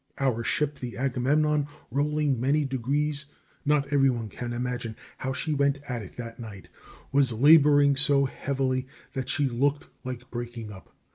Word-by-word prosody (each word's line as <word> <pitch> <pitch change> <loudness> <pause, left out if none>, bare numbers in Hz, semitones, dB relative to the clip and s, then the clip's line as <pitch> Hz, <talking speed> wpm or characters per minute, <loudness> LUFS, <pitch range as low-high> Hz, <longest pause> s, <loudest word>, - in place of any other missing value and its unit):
Our 125 -4 0
ship, 150 +1 0
the 120 -2 -6
Agamemnon, 140 +3 +1 0.2
rolling 145 -1 +1
many 145 +3 +2
degrees 140 +3 -1 0.4
not 145 -1 +1
every 135 -1 +5
one 115 -4 -2
can 120 +4 -5
imagine 120 -2 -3 0.2
how 130 - -2
she 155 +4 -2
went 140 -1 +2
at 125 -2 -3
it 95 - -11
that 115 -1 -7
night 105 -5 -9 0.4
was 140 -2 +3
laboring 145 +2 +6
so 140 0 +4
heavily 130 -1 -1 0.3
that 130 -2 -4
she 145 - +1
looked 140 +4 0
like 125 -1 -7
breaking 120 -2 -6
up. 95 -2 -14
135 Hz, 155 wpm, -27 LUFS, 120-145 Hz, 0.4 s, laboring